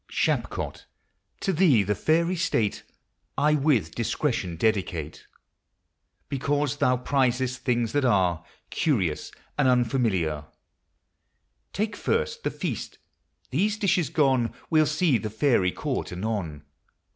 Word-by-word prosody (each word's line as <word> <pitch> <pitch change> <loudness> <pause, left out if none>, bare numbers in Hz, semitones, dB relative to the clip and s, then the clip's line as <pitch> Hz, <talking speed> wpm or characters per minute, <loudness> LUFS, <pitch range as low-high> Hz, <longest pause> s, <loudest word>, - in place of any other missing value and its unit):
Shapcot! - - -1 0.6
to 195 - 0
thee 155 - +4
the 105 +2 0
Fairy 170 - +1
State 120 - 0 0.6
I 150 +2 +3
with 135 - +2
discretion 115 - -1
dedicate: 90 -6 -1 1.0
Because 145 +1 -1
thou 125 -4 +2
prizest 130 0 0
things 120 -3 0
that 145 -1 +1
are 90 -8 +2 0.3
Curious 95 - 0 0.3
and 140 - +4
unfamiliar, 110 - +1 1.3
Take 210 +1 -2
first 470 0 -1
the - - +1
feast; - - -5 0.5
these 210 +2 +1
dishes 180 - +1
gone, 130 -6 +2 0.2
We'll 155 -1 +4
see 150 -4 +2
the 110 - -4
Fairy 110 -5 +2
court - - -3
anon. 90 -6 -3
125 Hz, 110 wpm, -26 LUFS, 105-150 Hz, 1.3 s, thee